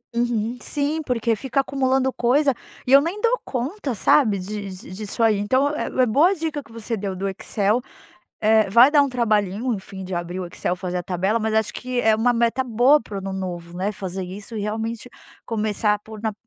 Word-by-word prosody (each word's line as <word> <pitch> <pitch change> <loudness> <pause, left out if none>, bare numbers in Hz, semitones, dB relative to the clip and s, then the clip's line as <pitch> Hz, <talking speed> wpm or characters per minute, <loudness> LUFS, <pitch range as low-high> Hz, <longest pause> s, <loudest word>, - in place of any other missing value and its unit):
Uhum. 235 0 0
Sim, 295 +2 -1
porque 230 -2 0
fica 265 +4 -2
acumulando 265 -1 +1
coisa 275 +3 +2 0.3
e 265 - +3
eu 280 - +9
nem 350 +7 -3
dou 475 +2 +3
conta, 270 - -3
sabe, 215 -1 +3
de 200 +1 -5
de 185 -1 -10
disso 210 +3 -5
aí. 220 -2 +4
Então 260 +8 +2
é - - -2
é 255 - +2
boa 285 +11 +4
a - - +2
dica 315 -4 -3
que 225 - -19
você 230 0 -4
deu 195 -2 -4
do 195 +2 -3
Excel. 205 +4 0 0.6
Eh, 215 -1 +4
vai 235 +5 +8
dar 295 -2 +5
um 280 - 0
trabalhinho, 220 -1 0
enfim, 190 -1 -6
de 185 -1 -5
abrir 175 +1 -4
o 180 - -4
Excel, 175 +1 -3
fazer 180 -1 -3
a - - -3
tabela, 190 +6 0
mas 220 0 -1
acho 220 -1 +1
que 250 -1 -2
é 220 -1 +4
uma 240 +3 +2
meta 235 +2 +1
boa 250 +5 +4
para 205 - -8
o - - -2
ano 195 0 -5
novo, 175 -2 -5
né, 195 +3 -1
fazer 190 -2 -5
isso 195 +5 -8
e, - - -2
realmente, 225 +3 -4 0.3
começar 215 -1 0
a - - -4
por 215 0 -11
na 220 -1 -1
220 Hz, 220 wpm, -22 LUFS, 195-255 Hz, 0.6 s, eu